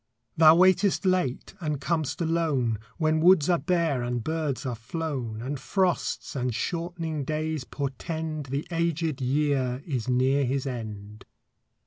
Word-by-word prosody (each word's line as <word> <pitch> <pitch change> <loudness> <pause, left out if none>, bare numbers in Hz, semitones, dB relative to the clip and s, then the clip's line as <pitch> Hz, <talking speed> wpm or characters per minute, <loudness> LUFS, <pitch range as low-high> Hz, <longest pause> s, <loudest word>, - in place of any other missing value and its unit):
Thou 155 0 +8
waitest 185 +2 +4
late 180 -9 0
and 150 -5 -2
com'st 160 +1 -1
alone, 155 -9 +1 0.2
When 155 -1 +2
woods 175 -1 +5
are 170 - +3
bare 170 -8 +1
and 120 -1 -2
birds 155 -3 -2
are 125 - -1
flown, 120 -2 -4
And 135 +2 -3
frosts 185 +2 -1
and 125 -3 -1
shortening 165 0 -3
days 155 -1 -2
portend 155 +2 -4
The 140 +3 -2
aged 165 -3 -1
year 135 -1 0
is 130 -6 -3
near 130 +3 +3
his 135 +1 -1
end. 105 -4 -6
150 Hz, 135 wpm, -27 LUFS, 130-165 Hz, 0.2 s, Thou